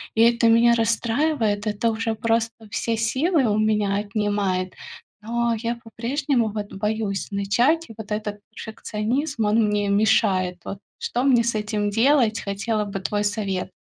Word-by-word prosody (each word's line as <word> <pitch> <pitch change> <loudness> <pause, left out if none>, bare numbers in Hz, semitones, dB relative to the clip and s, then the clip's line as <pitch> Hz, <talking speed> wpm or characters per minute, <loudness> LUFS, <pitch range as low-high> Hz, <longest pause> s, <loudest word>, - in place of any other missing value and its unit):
И 225 - +3
это 235 0 +4
меня 235 +1 +5
расстраивает, 225 -1 0
это 210 +2 0
уже 225 0 -2
просто 225 0 -1
все 225 +2 -1
силы 265 +6 +1
у 210 0 +1
меня 210 -2 +1
отнимает. 205 -3 -1 0.5
Но 235 +1 0
я 235 +2 -2
по-прежнему 235 +1 -1
вот 205 -1 -5
боюсь 210 0 -2
начать. 240 +12 +1
И - - -9
вот 215 -1 -9
этот 210 -1 -3
перфекционизм, 225 +4 -3
он 215 +1 +3
мне 205 -1 0
мешает. 200 -3 +2
Вот, 195 - -6 0.2
что 245 +2 -2
мне 245 -4 +4
с 235 -1 -1
этим 210 -1 -1
делать? 230 0 +3
Хотела 210 +2 -1
бы 195 -1 -5
твой 205 +2 -1
совет. 200 -3 -2
220 Hz, 150 wpm, -23 LUFS, 205-235 Hz, 0.5 s, меня